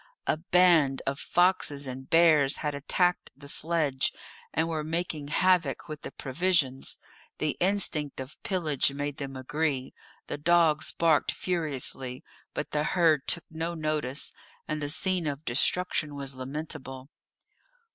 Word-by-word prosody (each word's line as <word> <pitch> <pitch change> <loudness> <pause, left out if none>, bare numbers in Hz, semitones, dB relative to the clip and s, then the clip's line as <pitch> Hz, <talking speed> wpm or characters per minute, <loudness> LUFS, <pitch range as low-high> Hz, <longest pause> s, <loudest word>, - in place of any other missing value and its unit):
A - - +1
band 165 -5 +4
of 135 +1 -2
foxes 175 -6 +1
and 130 0 -7
bears 155 -4 +5
had 150 - 0
attacked 175 +5 +1
the 140 0 -10
sledge, 155 -3 +1 0.4
and 160 +2 +1
were 160 -2 -2
making 160 -2 -2
havoc 165 -4 +2
with 155 -2 -7
the - - -6
provisions. 140 -2 0 0.4
The 155 -1 -1
instinct 175 -7 +1
of 130 +3 -8
pillage 155 -8 +1
made 145 0 -4
them 135 -2 -5
agree; 135 0 -2 0.3
the - - -5
dogs 165 -1 +3
barked 165 -2 +3
furiously, 140 -6 -2 0.3
but 150 - -3
the 150 0 +1
herd 160 -4 +2
took 170 - +2
no 165 +2 -3
notice, 155 -4 -1 0.3
and 155 0 -2
the 145 - -2
scene 180 +1 +1
of 145 +1 -4
destruction 150 +3 0
was 140 -1 -4
lamentable. 135 0 -6
150 Hz, 135 wpm, -28 LUFS, 140-170 Hz, 0.4 s, bears